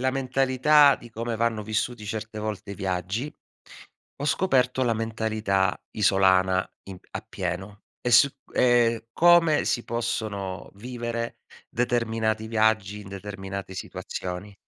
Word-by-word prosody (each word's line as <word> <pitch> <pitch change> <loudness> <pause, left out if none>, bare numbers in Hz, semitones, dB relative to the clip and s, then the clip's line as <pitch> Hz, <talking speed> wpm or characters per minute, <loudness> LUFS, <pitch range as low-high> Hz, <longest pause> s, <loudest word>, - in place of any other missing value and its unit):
la 130 +1 +2
mentalità 135 +2 +4
di 120 - -14
come 115 +1 -3
vanno 115 -1 0
vissuti 110 +1 -2
certe 110 +1 -5
volte 105 -1 -4
i - - -6
viaggi, 95 - -3 0.8
ho 145 - -5
scoperto 130 -5 +2
la 115 -2 +2
mentalità 110 -4 0 0.2
isolana, 95 -2 +3 0.2
in 95 -2 -9
a - - -3
pieno, 95 +3 -5 0.2
e 120 - -1
s 120 +4 +7 0.3
e 115 -2 +3
come 170 -1 +5
si 120 - 0
possono 110 -5 -3
vivere 115 +1 -5 0.3
determinati 115 -2 0
viaggi, 110 -2 +1
in 100 - -11
determinate 100 -1 -6
situazioni. 95 +1 -6
110 Hz, 125 wpm, -26 LUFS, 100-120 Hz, 0.8 s, s